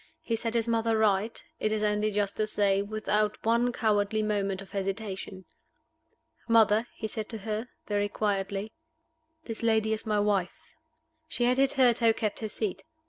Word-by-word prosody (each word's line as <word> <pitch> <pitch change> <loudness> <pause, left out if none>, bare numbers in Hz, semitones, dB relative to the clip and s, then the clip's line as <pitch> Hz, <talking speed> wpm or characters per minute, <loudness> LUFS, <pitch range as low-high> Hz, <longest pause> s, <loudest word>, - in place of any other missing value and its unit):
He 230 - 0
set 230 +1 -3
his 230 0 +1
mother 225 -1 +1
right, 215 +1 +1 0.2
it 215 - 0
is 215 0 0
only 210 0 +1
just 205 -1 -1
to 215 - +1
say, 200 -2 +2
without 210 0 0
one 235 +2 +3
cowardly 215 -2 +1
moment 200 -2 -1
of 195 - -11
hesitation. 195 -1 -4 1.0
"Mother," 225 0 +4
he - - -5
said 215 0 -4
to 225 - -5
her, 215 +3 -4 0.2
very 205 -1 0
quietly, 200 0 -2 0.7
"this 225 -6 -6
lady 220 -1 +2
is 220 +1 -4
my 210 -1 +2
wife." 205 -3 +1 0.7
She 250 - -1
had 250 +1 +3
hitherto 250 -4 +4
kept 215 -2 -2
her 220 - -4
seat. 210 -2 -3
215 Hz, 160 wpm, -28 LUFS, 205-225 Hz, 1.0 s, Mother